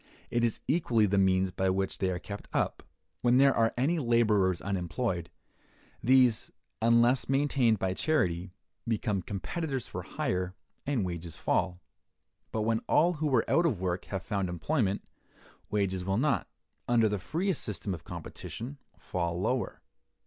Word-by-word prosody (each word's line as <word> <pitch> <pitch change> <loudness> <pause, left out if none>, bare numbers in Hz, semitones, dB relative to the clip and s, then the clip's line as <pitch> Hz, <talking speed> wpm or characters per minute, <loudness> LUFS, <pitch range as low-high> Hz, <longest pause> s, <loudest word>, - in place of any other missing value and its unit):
It 120 0 +1
is 115 -2 0
equally 125 -8 +3
the 100 0 +2
means 95 -1 +3
by 95 +1 0
which 95 0 -1
they 95 - +1
are 90 - -1
kept 100 +3 -8
up. - - 0 0.4
When 120 0 +4
there 135 0 +6
are 115 0 +3
any 155 +7 +2
laborers 105 - +3
unemployed, 90 -1 -2 0.7
these, 125 -3 +4 0.3
unless 120 +3 +4
maintained 135 -5 +3
by 95 -1 -1
charity, 95 - 0 0.4
become 105 -3 0
competitors 130 - -3
for - - -5
hire, 90 0 -2 0.3
and 130 -9 +1
wages 85 -2 -5
fall; 90 0 0 0.7
but 110 - -1
when 115 0 +1
all 175 +3 +4
who 155 -1 -1
were 130 -5 +3
out 170 +1 +4
of 115 - -1
work 90 -1 -2
have 95 -2 -4
found 100 -3 -1
employment, 100 - 0 0.7
wages 95 -3 0
will 95 +2 0
not, 135 - +1 0.4
under 115 -2 +4
the 105 -1 -1
freest 170 - -1
system 100 -1 -3
of 85 -2 -7
competition, 115 - -7 0.2
fall 85 -1 -2
lower. 125 +5 -1
105 Hz, 150 wpm, -30 LUFS, 95-125 Hz, 0.7 s, there